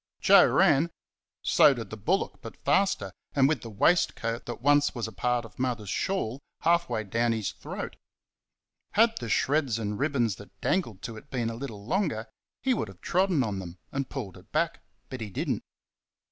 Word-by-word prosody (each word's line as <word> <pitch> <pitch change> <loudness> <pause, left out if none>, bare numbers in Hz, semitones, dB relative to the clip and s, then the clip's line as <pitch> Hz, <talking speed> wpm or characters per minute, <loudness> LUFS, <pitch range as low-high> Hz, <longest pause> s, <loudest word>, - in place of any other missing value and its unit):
Joe - - +7
ran 155 +5 +4 0.5
so 145 -2 +6
did 115 -4 -7
the - - -4
bullock, 170 - -1
but 115 - -9
faster, 190 +8 +2 0.2
and 135 -2 +5
with 155 - 0
the 115 - -7
waistcoat 115 - +1
that 120 - -5
once 145 +3 +3
was 115 -2 -2
a - - -7
part 120 +4 0
of 115 - -15
Mother's 120 -6 -1
shawl 140 - -1 0.2
half 170 -1 +3
way 110 -3 -1
down 115 +3 +1
his 110 -3 -2
throat. - - -7 1.0
Had 225 +2 +4
the 115 - -5
shreds 135 -1 +2
and 105 -1 -3
ribbons 130 -8 +1
that 100 -2 -14
dangled 115 - -1
to 115 -2 -5
it - - -13
been 120 -3 -1
a - - -6
little 115 -5 -7
longer, 150 - 0 0.4
he 260 0 +3
might 165 - -1
have 95 -2 -13
trodden 180 -6 +2
on 105 -4 -2
them 90 -1 -8
and 135 -1 -2
pulled 95 -4 -6
it - - -18
back, - - 0 0.3
but 130 -2 -6
he 110 - -4
did 95 - -3
n't. - - -2
120 Hz, 190 wpm, -28 LUFS, 110-145 Hz, 1.0 s, Joe